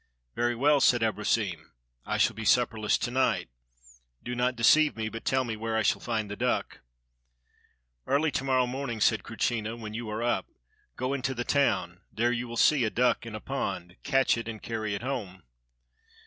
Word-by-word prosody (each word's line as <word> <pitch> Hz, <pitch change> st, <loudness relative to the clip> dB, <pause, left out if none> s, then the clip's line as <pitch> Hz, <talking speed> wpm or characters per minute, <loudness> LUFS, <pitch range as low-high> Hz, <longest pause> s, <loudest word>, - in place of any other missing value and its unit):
"Very 120 Hz, 0 st, 0 dB
well," 145 Hz, +3 st, +3 dB
said 120 Hz, -3 st, +4 dB
Abrosim. 105 Hz, -, -1 dB, 0.3 s
"I -, -, 0 dB
shall -, -, +2 dB
be 115 Hz, -, -6 dB
supperless 110 Hz, -2 st, +2 dB
to 120 Hz, -, -3 dB
night. 130 Hz, -, +1 dB, 0.7 s
Do 125 Hz, -, -4 dB
not 125 Hz, +1 st, 0 dB
deceive 150 Hz, +6 st, +5 dB
me, 110 Hz, -1 st, -2 dB
but 115 Hz, +1 st, -7 dB
tell 130 Hz, 0 st, +2 dB
me 115 Hz, -3 st, -4 dB
where 110 Hz, +1 st, -2 dB
I 110 Hz, -, +1 dB
shall -, -, +1 dB
find 110 Hz, -3 st, -2 dB
the 100 Hz, -, -5 dB
duck." -, -, -1 dB, 1.3 s
"Early 150 Hz, +2 st, +2 dB
to 130 Hz, -, -2 dB
morrow 130 Hz, -2 st, +2 dB
morning," 125 Hz, -2 st, -4 dB
said 110 Hz, +1 st, +3 dB
Krutschina, 115 Hz, 0 st, -2 dB
"when 110 Hz, -2 st, -7 dB
you 115 Hz, 0 st, -5 dB
are 110 Hz, +2 st, -3 dB
up, 120 Hz, -, 0 dB, 0.5 s
go 130 Hz, +2 st, -2 dB
into 135 Hz, -1 st, -2 dB
the 120 Hz, -, -2 dB
town; 140 Hz, -1 st, +1 dB
there 120 Hz, +2 st, +1 dB
you 125 Hz, 0 st, -2 dB
will 120 Hz, 0 st, -6 dB
see 145 Hz, -1 st, +4 dB
a 110 Hz, -, +1 dB
duck 120 Hz, 0 st, +1 dB
in 110 Hz, -, -6 dB
a -, -, -5 dB
pond, 90 Hz, -3 st, -4 dB
catch 135 Hz, -3 st, +2 dB
it, 115 Hz, -, -6 dB
and 110 Hz, -2 st, -5 dB
carry 110 Hz, -3 st, -3 dB
it 100 Hz, -, -6 dB
home." 105 Hz, -, -4 dB
115 Hz, 190 wpm, -28 LUFS, 110-125 Hz, 1.3 s, deceive